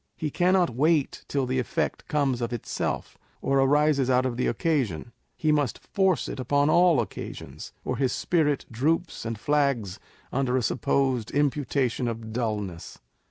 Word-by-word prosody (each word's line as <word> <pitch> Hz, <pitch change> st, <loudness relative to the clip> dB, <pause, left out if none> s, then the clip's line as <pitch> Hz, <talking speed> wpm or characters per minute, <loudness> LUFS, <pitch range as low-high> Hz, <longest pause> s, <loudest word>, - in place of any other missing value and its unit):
He 155 Hz, -2 st, -3 dB
cannot 180 Hz, 0 st, +3 dB
wait 150 Hz, +4 st, +1 dB
till 140 Hz, -2 st, 0 dB
the 130 Hz, +1 st, 0 dB
effect 125 Hz, -, -2 dB
comes 135 Hz, -5 st, 0 dB
of 120 Hz, 0 st, -2 dB
itself, 120 Hz, -2 st, -3 dB, 0.2 s
or 135 Hz, 0 st, +1 dB
arises 140 Hz, -1 st, +3 dB
out 130 Hz, 0 st, +3 dB
of 125 Hz, -2 st, -1 dB
the 125 Hz, -, 0 dB
occasion: 120 Hz, -, -1 dB, 0.3 s
he 155 Hz, -, +1 dB
must 145 Hz, -5 st, +1 dB
force 190 Hz, -6 st, 0 dB
it -, -, -6 dB
upon 145 Hz, +4 st, +2 dB
all 175 Hz, -4 st, +5 dB
occasions, 110 Hz, -5 st, -6 dB
or 125 Hz, -, -2 dB
his 130 Hz, -1 st, +1 dB
spirit 150 Hz, -5 st, +1 dB
droops 155 Hz, +6 st, -1 dB
and 115 Hz, -2 st, -4 dB
flags 135 Hz, -8 st, 0 dB, 0.3 s
under 130 Hz, -1 st, +1 dB
a 125 Hz, -, 0 dB
supposed 130 Hz, -1 st, 0 dB
imputation 140 Hz, -3 st, 0 dB
of 115 Hz, -1 st, -5 dB
dulness. 105 Hz, -7 st, -3 dB
135 Hz, 155 wpm, -26 LUFS, 120-150 Hz, 0.3 s, all